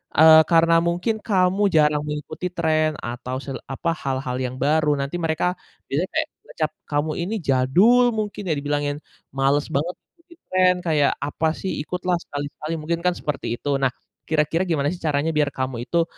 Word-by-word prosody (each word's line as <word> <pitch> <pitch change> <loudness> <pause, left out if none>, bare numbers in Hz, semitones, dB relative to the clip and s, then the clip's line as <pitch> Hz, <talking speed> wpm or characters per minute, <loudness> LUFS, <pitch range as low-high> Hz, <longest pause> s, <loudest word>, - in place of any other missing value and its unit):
eee, 160 +1 +9
karena 165 0 +5
mungkin 175 +6 0
kamu 195 0 +2
jarang 150 -1 +3
mengikuti 150 +4 -4
tren 155 -3 +1
atau 125 +2 -5
sel 135 - -5
apa, 165 +5 -1
hal-hal 130 -3 -3
yang 125 0 -3
baru, 150 +1 +2
nanti 140 +4 -3
mereka 165 +2 0 0.3
biasanya 165 +8 -1
kayak 320 0 +1 0.2
ngecap 155 -1 -2 0.2
kamu 150 +1 0
ini 215 +5 -3
jadul 185 - +4
mungkin 210 -2 -3
ya, - - +3
dibilangin, 145 0 -1 0.4
malas 140 +2 +2
banget 155 +6 -1 0.2
ikuti 340 0 -19
tren, 185 0 +4
kayak, 150 -3 +3
"Apa 155 +2 0
sih, 190 - -4
ikutlah 180 +1 -1
sekali-sekali!" 145 +2 -5
Mungkin 170 +2 -2
kan 180 - +3
seperti 145 -5 -3
itu. 145 -1 -1
Nah, 135 -2 +2 0.4
kira-kira 160 +2 +1
gimana 145 -4 +1
sih 180 - -6
caranya 150 0 0
biar 150 -1 +2
kamu 130 -2 -3
itu 170 -1 +2
155 Hz, 165 wpm, -23 LUFS, 145-180 Hz, 0.4 s, eee